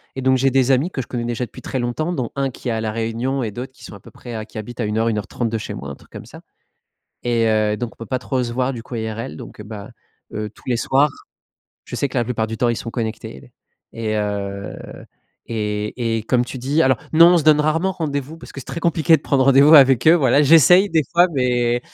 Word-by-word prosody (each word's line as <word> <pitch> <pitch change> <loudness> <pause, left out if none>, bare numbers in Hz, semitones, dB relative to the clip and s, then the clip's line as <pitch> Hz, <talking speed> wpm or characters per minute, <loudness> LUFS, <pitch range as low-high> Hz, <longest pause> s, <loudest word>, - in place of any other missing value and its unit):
et 135 - -4
donc 130 0 +3
j'ai 135 +1 +2
des 135 0 +3
amis 135 +6 +2
que 135 - -3
je 120 - -10
connais 120 -2 -4
déjà 120 +1 -2
depuis - - -13
très 130 - -4
longtemps 125 +8 -2
dont 130 -8 -3
1 135 -1 0
qui 125 - -7
est - - 0
à 110 -1 -2
la 110 -1 -2
Réunion 115 +4 -2
et 110 - -3
d'autres 125 +5 -7
qui - - -19
sont - - -10
à 100 - -12
peu - - -16
près 115 -3 -8
qui 110 - -12
habitent 115 +3 -8
à 115 - 0
1 105 +1 -2
heure, 115 +1 +1
1 110 - -1
heure 105 - -4
30 120 -2 -3
de 115 - -2
chez 110 - -6
moi, - - -7
un - - -7
truc - - -22
comme - - -9
ça, - - -13 0.8
et 120 -2 +1
heu, 110 -1 +1
donc 120 0 -5
on - - -35
peut - - -14
pas 130 - -2
trop 130 +1 -2
se 120 -1 -4
voir, 130 +2 -1
du 120 -3 -7
coup, 120 - -10
IRL, 110 -7 -5
donc - - -11
heu, - - -8
bah, 105 -1 -9 0.4
heu, 105 0 -4
tous - - -22
les 125 - +1
soirs, 140 +5 +2 0.7
je - - -9
sais 140 - 0
que 130 - -7
la 120 - +1
plupart 115 -2 -2
du 110 0 -5
temps, 120 +2 +1
ils 120 - -1
sont 115 - -6
connectés 115 -2 -6 0.4
et 115 - -8
et 110 - 0
heu, 100 -1 -3 0.7
et 110 +1 -2
et - - -5
comme 125 +1 +1
tu 130 - -7
dis 140 +6 +1
alors 130 -3 +3 0.2
non, 165 +2 +8
on - - +4
se 155 - -2
donne 155 -1 +5
rarement 165 +5 +1
rendez-vous 150 -3 -4
parce 165 - -13
que 135 - -8
c'est - - -13
très 170 - -5
compliqué 165 -1 +3
de - - -12
prendre 135 -3 +2
rendez-vous 140 +3 +6
avec 135 -1 +6
eux. 160 - +8
Voilà, 140 -3 +3
j'essaye 165 +6 +6
des 160 -1 +3
fois, 175 +1 +6
mais 120 -2 +1
125 Hz, 275 wpm, -20 LUFS, 110-140 Hz, 0.8 s, non